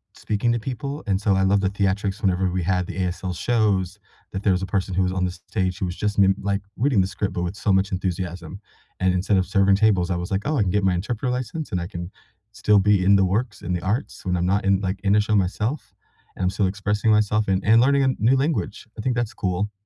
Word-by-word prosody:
speaking 110 Hz, +3 st, -1 dB
to 120 Hz, -, -1 dB
people, 140 Hz, +5 st, -5 dB
and 100 Hz, -1 st, 0 dB
so, 100 Hz, -2 st, +2 dB
I 95 Hz, -, +2 dB
love 100 Hz, +1 st, +3 dB
the 95 Hz, -, +1 dB
theatrics 100 Hz, +1 st, -1 dB
whenever 95 Hz, -1 st, +1 dB
we 90 Hz, 0 st, -2 dB
had 90 Hz, 0 st, 0 dB
the -, -, -7 dB
ASL 90 Hz, 0 st, -2 dB
shows, 100 Hz, -3 st, 0 dB, 0.3 s
that 95 Hz, -, -4 dB
there 100 Hz, -, +3 dB
was 90 Hz, +1 st, 0 dB
a -, -, 0 dB
person 95 Hz, 0 st, -2 dB
who 95 Hz, -, +2 dB
was 90 Hz, -, 0 dB
on 95 Hz, 0 st, -1 dB
the 90 Hz, -, 0 dB
stage 95 Hz, 0 st, -3 dB
who 100 Hz, -, -2 dB
was 90 Hz, -1 st, -4 dB
just 105 Hz, -1 st, -2 dB
mim 95 Hz, -1 st, +5 dB
like, 100 Hz, 0 st, -1 dB, 0.2 s
reading 125 Hz, -4 st, +2 dB
the 95 Hz, -, 0 dB
script 100 Hz, -1 st, -3 dB
but 90 Hz, -, -2 dB
with 90 Hz, +3 st, -3 dB
so 100 Hz, -, 0 dB
much 95 Hz, +1 st, +2 dB
enthusiasm, 90 Hz, -1 st, -4 dB, 0.4 s
and 95 Hz, -1 st, +2 dB
instead 95 Hz, +2 st, +1 dB
of 95 Hz, -, +1 dB
serving 100 Hz, +1 st, +3 dB
tables, 95 Hz, -4 st, +2 dB
I 90 Hz, -, 0 dB
was, 90 Hz, +2 st, -5 dB
like, 95 Hz, -, 0 dB
"Oh, 150 Hz, +1 st, 0 dB
I 110 Hz, -, +3 dB
can 95 Hz, -, -1 dB
get 100 Hz, +1 st, +1 dB
my 95 Hz, -2 st, +2 dB
interpreter 115 Hz, +7 st, -2 dB
license, 130 Hz, +5 st, -4 dB
and 90 Hz, -, -1 dB
I 85 Hz, -, -3 dB
can 85 Hz, +1 st, -7 dB, 0.4 s
still 105 Hz, -1 st, +3 dB
be 100 Hz, -2 st, +3 dB
in 100 Hz, -, +6 dB
the 95 Hz, -1 st, +4 dB
works, 105 Hz, +3 st, -2 dB
in 90 Hz, +1 st, -3 dB
the 90 Hz, -, -2 dB
arts 105 Hz, -, -3 dB
when 90 Hz, -1 st, 0 dB
I'm 85 Hz, -, 0 dB
not 100 Hz, +2 st, +1 dB
in, 95 Hz, 0 st, +3 dB
like, 95 Hz, 0 st, -2 dB
in 100 Hz, 0 st, +3 dB
a 105 Hz, -, +5 dB
show, 105 Hz, +1 st, 0 dB
myself, 105 Hz, +8 st, -1 dB, 0.4 s
and 95 Hz, -, -4 dB
I'm 90 Hz, -, +2 dB
still 95 Hz, 0 st, 0 dB
expressing 105 Hz, +2 st, 0 dB
myself 105 Hz, 0 st, +2 dB
and 95 Hz, 0 st, +1 dB
and 110 Hz, +2 st, +6 dB
learning 140 Hz, +1 st, +3 dB
a -, -, +3 dB
new 120 Hz, +5 st, +4 dB
language." 140 Hz, -4 st, -2 dB
I -, -, -4 dB
think 125 Hz, +2 st, -1 dB
that's 120 Hz, -2 st, -2 dB
cool. 95 Hz, +3 st, -2 dB
100 Hz, 265 wpm, -23 LUFS, 95-105 Hz, 0.4 s, in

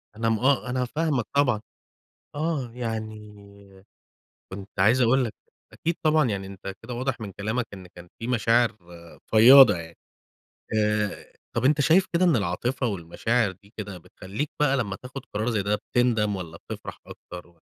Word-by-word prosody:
أنا 115 Hz, +1 st, 0 dB
م 110 Hz, -, +1 dB
آه، 130 Hz, -1 st, +2 dB
أنا 125 Hz, 0 st, 0 dB
فاهمك 150 Hz, -3 st, -1 dB
طبعًا 125 Hz, -7 st, +3 dB, 0.7 s
آه، 150 Hz, -5 st, -2 dB
يعني 105 Hz, -4 st, -8 dB, 0.7 s
كُنت 100 Hz, +1 st, -8 dB
عايز 115 Hz, +7 st, +4 dB
أقول 125 Hz, +2 st, +4 dB
لك، 110 Hz, -, -5 dB, 0.4 s
أكيد 170 Hz, +1 st, -2 dB
طبعًا 155 Hz, -5 st, +3 dB
يعني 95 Hz, -2 st, -3 dB
أنت 95 Hz, 0 st, -7 dB
كده 120 Hz, +2 st, -6 dB
واضح 130 Hz, +1 st, -2 dB
من 105 Hz, -3 st, -6 dB
كلامك 110 Hz, +5 st, -2 dB
إن 95 Hz, -2 st, -10 dB
كان 90 Hz, 0 st, -14 dB
في 115 Hz, -, -5 dB
مشاعر 115 Hz, -1 st, +2 dB, 0.5 s
فياضة 120 Hz, +1 st, +8 dB
يعني 85 Hz, 0 st, -10 dB, 0.8 s
آآ، 105 Hz, -1 st, -1 dB, 0.2 s
طب 120 Hz, +2 st, 0 dB
أنت 145 Hz, +1 st, +4 dB
شايف 165 Hz, +6 st, +4 dB
كده 180 Hz, +2 st, +3 dB
إن 170 Hz, -6 st, +4 dB
العاطفة 120 Hz, +6 st, -1 dB
والمشاعر 105 Hz, +4 st, 0 dB
دي 100 Hz, +4 st, -21 dB
كده 100 Hz, -3 st, -6 dB
بتخليك 100 Hz, -, -6 dB
بقى 140 Hz, -2 st, +3 dB
لمّا 100 Hz, -6 st, -2 dB
تاخد 125 Hz, +3 st, -9 dB
قرار 110 Hz, +3 st, -1 dB
زي 105 Hz, -4 st, 0 dB
ده 105 Hz, +1 st, +1 dB
بتندم 110 Hz, -2 st, +1 dB
والّا 85 Hz, -3 st, -7 dB
بتفرح -, -, -8 dB
أكتر 90 Hz, 0 st, -10 dB
و 85 Hz, 0 st, -26 dB
110 Hz, 160 wpm, -25 LUFS, 100-130 Hz, 0.8 s, فياضة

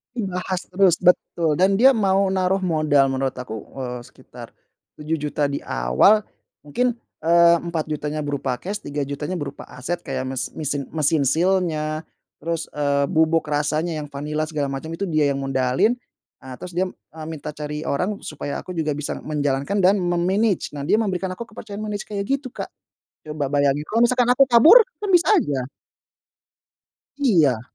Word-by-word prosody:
Dibahas 185 Hz, -4 st, -3 dB
terus, 180 Hz, -2 st, +3 dB
betul, 170 Hz, -3 st, +2 dB
dan 195 Hz, +4 st, +3 dB
dia 265 Hz, +1 st, +7 dB
mau 195 Hz, -2 st, +2 dB
naruh 190 Hz, 0 st, +1 dB
modal 155 Hz, -6 st, +2 dB
menurut 135 Hz, 0 st, -1 dB
aku, 110 Hz, -4 st, -7 dB, 0.2 s
eee, 125 Hz, -1 st, -4 dB
sekitar -, -, -13 dB, 0.5 s
Rp7.000.000 150 Hz, -1 st, -1 dB
di 140 Hz, -, -4 dB
awal, 60 Hz, -, +3 dB, 0.5 s
mungkin, 245 Hz, -, +1 dB, 0.3 s
eee, 170 Hz, +1 st, +6 dB
Rp4.000.000-nya 155 Hz, -3 st, -3 dB
berupa 140 Hz, -4 st, -2 dB
cash, 205 Hz, +3 st, -5 dB
Rp3.000.000-nya 145 Hz, +4 st, -4 dB
berupa 145 Hz, -2 st, -6 dB
aset, 170 Hz, +8 st, -4 dB
kayak 130 Hz, -, -3 dB
mes 130 Hz, 0 st, -3 dB
misin 145 Hz, -2 st, -3 dB
mesin 155 Hz, -1 st, +2 dB
seal-nya, 160 Hz, 0 st, 0 dB, 0.4 s
terus, 165 Hz, -1 st, -2 dB
eee, 140 Hz, -1 st, +1 dB
bubuk 160 Hz, 0 st, +2 dB
rasanya 150 Hz, +3 st, -1 dB
yang 145 Hz, -, -11 dB
vanila, 150 Hz, +2 st, -3 dB
segala 150 Hz, -3 st, -2 dB
macam, 135 Hz, +4 st, -5 dB
itu 190 Hz, +4 st, -3 dB
dia 155 Hz, -3 st, +2 dB
yang 135 Hz, -, -2 dB
modalin. 135 Hz, -, +1 dB, 0.5 s
Ah, 130 Hz, -1 st, -9 dB
terus 180 Hz, -1 st, -9 dB
dia, 185 Hz, +1 st, 0 dB
eee, 155 Hz, 0 st, -12 dB
minta 150 Hz, -1 st, -7 dB
cari 150 Hz, +1 st, -5 dB
orang 185 Hz, +8 st, -1 dB
supaya 145 Hz, -1 st, -5 dB
aku 180 Hz, -, -8 dB
juga 155 Hz, -2 st, -1 dB
bisa 145 Hz, 0 st, -3 dB
menjalankan 145 Hz, +5 st, -1 dB
dan 190 Hz, +2 st, +5 dB
me-manage, 180 Hz, +1 st, 0 dB
nah, 140 Hz, -, -5 dB
dia 210 Hz, +9 st, +2 dB
memberikan 190 Hz, -3 st, -1 dB
aku 230 Hz, +5 st, -7 dB
kepercayaan 205 Hz, 0 st, -9 dB
manage 205 Hz, 0 st, -4 dB
kayak 200 Hz, -1 st, -5 dB
gitu, 275 Hz, -2 st, -2 dB
Kak, -, -, -6 dB, 0.6 s
coba 150 Hz, -2 st, -2 dB
bayangin, 145 Hz, +1 st, +2 dB
kalau 225 Hz, +2 st, 0 dB
misalkan 245 Hz, +1 st, +3 dB
aku 270 Hz, 0 st, +4 dB
kabur? 320 Hz, -, +8 dB, 0.2 s
Kan, 410 Hz, -2 st, -2 dB
bisa 355 Hz, +2 st, +5 dB
aja. 135 Hz, -, -1 dB, 1.5 s
Iya. 160 Hz, -, +3 dB
160 Hz, 160 wpm, -22 LUFS, 145-190 Hz, 1.5 s, kabur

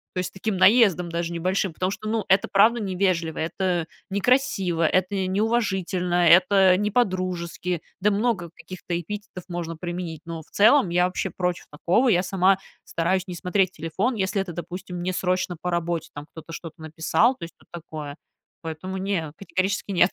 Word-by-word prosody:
То -, -, 0 dB
есть, 180 Hz, 0 st, -2 dB
с -, -, -29 dB
таким 195 Hz, +1 st, -3 dB
наездом 190 Hz, -4 st, +5 dB
даже 170 Hz, 0 st, -3 dB
небольшим, 185 Hz, +2 st, -1 dB
потому 185 Hz, +4 st, -1 dB
что, 215 Hz, +2 st, -5 dB
ну, 220 Hz, 0 st, 0 dB
это 190 Hz, +1 st, +4 dB
правда 220 Hz, +4 st, +4 dB
невежливо, 185 Hz, -5 st, 0 dB
это 170 Hz, 0 st, -1 dB, 0.2 s
некрасиво, 195 Hz, -6 st, +2 dB
это 185 Hz, +5 st, +1 dB
неуважительно, 190 Hz, -3 st, +1 dB
это 185 Hz, +1 st, +6 dB
не 210 Hz, +2 st, 0 dB
по-дружески. 180 Hz, -5 st, -1 dB, 0.2 s
Да, 210 Hz, +2 st, +3 dB
много 200 Hz, -5 st, 0 dB
каких-то 170 Hz, 0 st, -5 dB
эпитетов 200 Hz, 0 st, -7 dB
можно 170 Hz, -1 st, -4 dB
применить, 175 Hz, -1 st, -5 dB
но 165 Hz, -1 st, -6 dB
в -, -, -28 dB
целом 215 Hz, +1 st, +5 dB
я 180 Hz, +1 st, +3 dB
вообще 180 Hz, -, -3 dB
против 180 Hz, -1 st, -2 dB
такого. 180 Hz, -, +2 dB
Я 180 Hz, -5 st, +4 dB
сама 190 Hz, +1 st, +2 dB, 0.2 s
стараюсь 180 Hz, +3 st, 0 dB
не 180 Hz, -, -5 dB
смотреть 185 Hz, +1 st, +1 dB
телефон, 190 Hz, +10 st, -2 dB
если 195 Hz, -1 st, -1 dB
это, 185 Hz, -3 st, -6 dB
допустим, 180 Hz, +1 st, -6 dB
не 180 Hz, +1 st, -1 dB
срочно 185 Hz, -1 st, 0 dB
по 180 Hz, +1 st, -3 dB
работе, 170 Hz, -1 st, -2 dB
там, 145 Hz, 0 st, -8 dB
кто-то 165 Hz, 0 st, -10 dB
что-то 165 Hz, -1 st, -8 dB
написал. 160 Hz, -, +2 dB
То 185 Hz, -, -11 dB
есть, 170 Hz, -, -13 dB
тут -, -, -24 dB
такое. 155 Hz, -4 st, -7 dB, 0.5 s
Поэтому 165 Hz, +4 st, -5 dB
не, 190 Hz, -5 st, -2 dB
категорически 195 Hz, +1 st, -2 dB
нет. 180 Hz, 0 st, +4 dB
180 Hz, 175 wpm, -24 LUFS, 170-195 Hz, 0.5 s, это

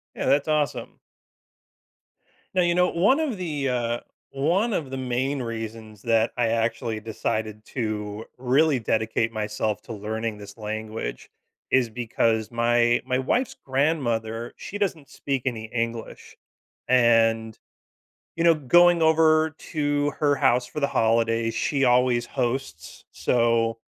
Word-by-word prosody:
Yeah, -, -, -3 dB
that's 145 Hz, +2 st, +3 dB
awesome. 150 Hz, -2 st, -1 dB, 1.6 s
Now, 185 Hz, -, +3 dB
you 175 Hz, 0 st, +2 dB
know, 180 Hz, 0 st, +3 dB
one 205 Hz, -, +3 dB
of 285 Hz, -10 st, -1 dB
the, 150 Hz, -6 st, -2 dB
uh, 120 Hz, -1 st, -1 dB, 0.3 s
one 185 Hz, +11 st, +1 dB
of 145 Hz, -7 st, -2 dB
the 135 Hz, -, -5 dB
main 130 Hz, +2 st, -1 dB
reasons 110 Hz, -2 st, -6 dB
that 115 Hz, -1 st, +2 dB
I 120 Hz, -2 st, +2 dB
actually 115 Hz, 0 st, -1 dB
decided 110 Hz, -1 st, -3 dB
to 110 Hz, -2 st, -4 dB
really 135 Hz, +3 st, +2 dB
dedicate 110 Hz, 0 st, 0 dB
myself 105 Hz, -1 st, -2 dB
to 115 Hz, -, -8 dB
learning 110 Hz, +1 st, -4 dB
this 105 Hz, +1 st, -11 dB
language, 110 Hz, -, -5 dB, 0.4 s
is 130 Hz, -3 st, +3 dB
because 110 Hz, -1 st, 0 dB
my 120 Hz, 0 st, +2 dB
my 130 Hz, 0 st, 0 dB
wife's 245 Hz, -, 0 dB
grandmother, 120 Hz, -5 st, -1 dB
she 205 Hz, -, -7 dB
doesn't 175 Hz, -8 st, -2 dB
speak 135 Hz, -2 st, -3 dB
any 115 Hz, -4 st, -2 dB
English, 115 Hz, 0 st, -5 dB, 0.5 s
and, 115 Hz, -3 st, +3 dB, 0.8 s
you 165 Hz, -, 0 dB
know, 170 Hz, -1 st, +6 dB
going 170 Hz, +4 st, +4 dB
over 160 Hz, 0 st, +4 dB
to 145 Hz, -2 st, -1 dB
her 145 Hz, -1 st, +3 dB
house 125 Hz, -2 st, +2 dB
for 150 Hz, -, -6 dB
the 140 Hz, -, +1 dB
holidays, 115 Hz, 0 st, +1 dB
she 135 Hz, +4 st, 0 dB
always 125 Hz, -1 st, +3 dB
hosts, 120 Hz, -, -4 dB
so 115 Hz, -1 st, +1 dB
120 Hz, 135 wpm, -25 LUFS, 115-145 Hz, 1.6 s, know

